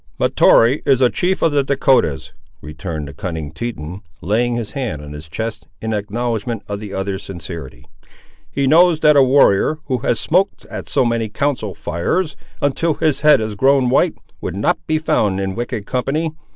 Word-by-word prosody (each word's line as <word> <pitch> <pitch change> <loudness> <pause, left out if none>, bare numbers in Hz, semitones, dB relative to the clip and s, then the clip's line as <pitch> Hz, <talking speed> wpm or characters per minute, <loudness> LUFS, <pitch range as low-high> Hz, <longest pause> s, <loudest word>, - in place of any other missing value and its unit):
"Mahtoree 120 +6 +4
is 135 -3 +3
a 125 -2 +4
chief 185 +1 0
of 165 - +3
the 145 -1 +2
Dahcotahs," 130 - +1 0.3
returned 75 -1 -6
the 70 - -9
cunning 80 -1 -5
Teton, 90 -1 -6 0.2
laying 120 +6 0
his 115 -3 -4
hand 125 - -3
on 75 0 -9
his 75 +2 -10
chest, 110 +5 -5
in 110 0 -3
acknowledgment 110 +1 -2
of 100 -1 -4
the 105 -2 -8
other's 95 0 -3
sincerity. 85 -9 -8 0.6
"He 140 - -1
knows 165 +3 +5
that 150 -1 +5
a 140 - +7
warrior, 135 +1 +4
who 130 -3 -1
has 115 - 0
smoked 185 +4 +1
at - - -6
so - - +2
many 115 -2 0
council 115 - -2
fires, 140 - -2 0.3
until 150 +3 +1
his 150 -4 0
head 150 -2 +6
has 110 -1 -3
grown 130 +3 +3
white, 160 +5 +3 0.3
would - - -4
not 100 - +1
be 155 - +2
found 105 -10 +1
in 95 -1 -2
wicked 120 -1 -4
company. 145 +7 -1
115 Hz, 180 wpm, -19 LUFS, 95-140 Hz, 0.6 s, a